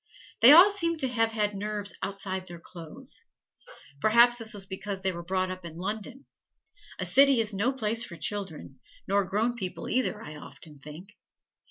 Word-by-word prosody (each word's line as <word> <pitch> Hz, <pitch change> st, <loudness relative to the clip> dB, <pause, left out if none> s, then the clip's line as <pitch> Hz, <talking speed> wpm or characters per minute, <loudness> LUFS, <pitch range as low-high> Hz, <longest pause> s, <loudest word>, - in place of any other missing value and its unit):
They 240 Hz, +4 st, +9 dB
all 355 Hz, +7 st, +9 dB
seem 335 Hz, -4 st, 0 dB
to 270 Hz, -, +1 dB
have 225 Hz, -2 st, 0 dB
had 210 Hz, -1 st, 0 dB
nerves 205 Hz, 0 st, -3 dB
outside 195 Hz, -1 st, -4 dB
of 185 Hz, -, -15 dB
their 175 Hz, -1 st, -9 dB
clothes. 165 Hz, -2 st, -8 dB, 0.8 s
Perhaps 235 Hz, +5 st, +5 dB
this 225 Hz, -1 st, -1 dB
was 200 Hz, -3 st, -5 dB
because 195 Hz, 0 st, -6 dB
they 190 Hz, 0 st, 0 dB
were 170 Hz, -1 st, -7 dB
brought 185 Hz, +1 st, -1 dB
up 185 Hz, 0 st, -8 dB
in 165 Hz, -2 st, -9 dB
London. 220 Hz, +8 st, -5 dB, 0.7 s
A -, -, -2 dB
city 275 Hz, -2 st, +5 dB
is 215 Hz, -2 st, +1 dB
no 205 Hz, +7 st, +1 dB
place 230 Hz, -3 st, -1 dB
for 175 Hz, -, -8 dB
children 165 Hz, -8 st, -5 dB, 0.3 s
nor 200 Hz, +1 st, +2 dB
grown 215 Hz, +6 st, 0 dB
people 185 Hz, -6 st, -5 dB
either, 250 Hz, -3 st, 0 dB
I 150 Hz, +1 st, -9 dB
often 145 Hz, +1 st, -11 dB
think. 165 Hz, +9 st, -12 dB
205 Hz, 180 wpm, -28 LUFS, 185-230 Hz, 0.8 s, They